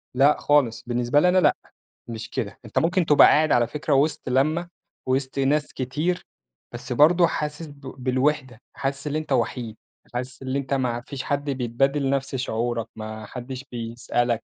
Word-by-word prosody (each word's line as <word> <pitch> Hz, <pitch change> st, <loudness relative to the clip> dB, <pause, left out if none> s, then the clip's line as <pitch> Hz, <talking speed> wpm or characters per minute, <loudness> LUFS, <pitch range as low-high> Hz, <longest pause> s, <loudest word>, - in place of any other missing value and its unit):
لأ 140 Hz, +3 st, +5 dB
خالص، 130 Hz, -6 st, +2 dB
بالنسبة 120 Hz, +3 st, +2 dB
لي 180 Hz, +4 st, +4 dB
أنا 185 Hz, -, +3 dB
لأ، 185 Hz, -, +5 dB, 0.5 s
مش 115 Hz, 0 st, -6 dB
كده، 100 Hz, -, -4 dB
أنت 110 Hz, -, 0 dB
ممكن 175 Hz, +2 st, +2 dB
تبقى 150 Hz, -2 st, +7 dB
قاعد 155 Hz, 0 st, +4 dB
على 120 Hz, -1 st, +4 dB
فكرة 150 Hz, +3 st, -2 dB
وسط 140 Hz, -1 st, +1 dB
لمَّة 155 Hz, +7 st, +1 dB, 0.4 s
وسط 130 Hz, +1 st, -1 dB
ناس 145 Hz, +2 st, +1 dB
كتير، 150 Hz, +8 st, -2 dB, 0.5 s
بس 125 Hz, +1 st, -5 dB
برضه 170 Hz, +6 st, +5 dB
حاسس 150 Hz, +1 st, -4 dB
ب 145 Hz, -1 st, -14 dB, 0.2 s
بالوحدة، 130 Hz, -1 st, 0 dB
حاسس 140 Hz, +1 st, -3 dB
اللي 150 Hz, +1 st, -1 dB
أنت 155 Hz, -2 st, -9 dB
وحيد، 115 Hz, -3 st, -1 dB, 0.4 s
حاسس 125 Hz, +2 st, -5 dB
اللي 130 Hz, +1 st, -1 dB
أنت 140 Hz, 0 st, -3 dB
ما 125 Hz, -3 st, 0 dB
فيش 135 Hz, +1 st, -6 dB
حد 145 Hz, 0 st, -2 dB
بيتبادل 135 Hz, +2 st, 0 dB
نفس 135 Hz, -1 st, -1 dB
شعورك، 120 Hz, -2 st, -2 dB
ما 110 Hz, 0 st, -7 dB
حدش 125 Hz, +3 st, -7 dB
بيسألك، 120 Hz, 0 st, -1 dB
135 Hz, 165 wpm, -24 LUFS, 120-150 Hz, 0.5 s, تبقى